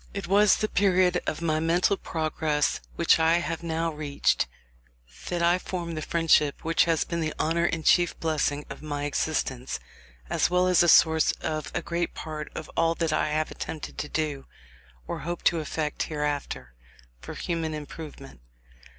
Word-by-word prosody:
It 200 -2 -3
was 200 +2 +5
the 215 - 0
period 185 -3 +3
of 155 - -2
my 155 -2 +1
mental 175 +5 +2
progress 155 -4 -1 0.2
which - - +4
I 160 +1 +4
have 170 -1 -3
now 165 0 -1
reached 145 - 0 0.8
that 175 -1 -1
I 175 +2 +4
formed 170 -3 -4
the 155 - -3
friendship 155 -3 +2
which 165 0 +3
has 165 -4 +2
been 170 - -3
the 155 -1 -2
honour 170 +2 +1
and 165 -2 -1
chief 175 -1 +3
blessing 150 -2 0
of - - -9
my 145 -1 -4
existence, 140 -3 -2 0.5
as - - +1
well 180 0 +3
as 180 -1 +4
the 175 - +5
source 160 0 +5
of 155 -1 -4
a 170 - -1
great 170 0 -2
part 155 -1 -6
of 155 - -5
all 165 0 +2
that 165 -3 0
I 155 - +1
have 155 +1 -1
attempted 155 - -6
to 150 - -4
do, 150 -4 -2 0.6
or - - -4
hope 175 +2 -5
to 170 - +3
effect 155 -1 -3
hereafter, 145 - -3 0.5
for - - -8
human 165 -2 -2
improvement. 145 - -9
160 Hz, 170 wpm, -27 LUFS, 150-170 Hz, 0.8 s, was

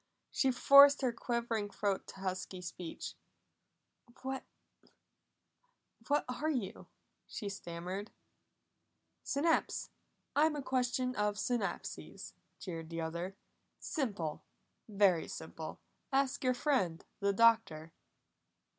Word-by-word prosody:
She 270 - +2
forced 280 +3 +8
her 250 -2 +2
quivering 230 -3 -1
throat 200 -1 -1
to 190 - -10
husky 185 0 -3
speech. 175 -1 -6 1.1
"What 265 0 -2 1.7
what 290 0 +2
are 250 +5 -2
you?" 250 -11 -3 0.4
she 205 - -5
stammered. 185 +2 -5 1.1
"Synapse! 315 +3 +1 0.4
I'm 300 +1 +4
a 290 - -4
question 255 0 0
of 210 0 +1
synapses," 225 0 -3 0.2
jeered 165 -3 -6
the 165 0 -4
other. 170 +4 -4 0.4
"Simple! 200 - -2 0.5
Very 195 -5 +3
simple! - - -7 0.3
Ask 270 -1 +1
your 255 -1 +3
friend 245 - 0
the 200 -1 +2
Doctor!" 200 -8 +3
215 Hz, 100 wpm, -34 LUFS, 185-260 Hz, 1.7 s, forced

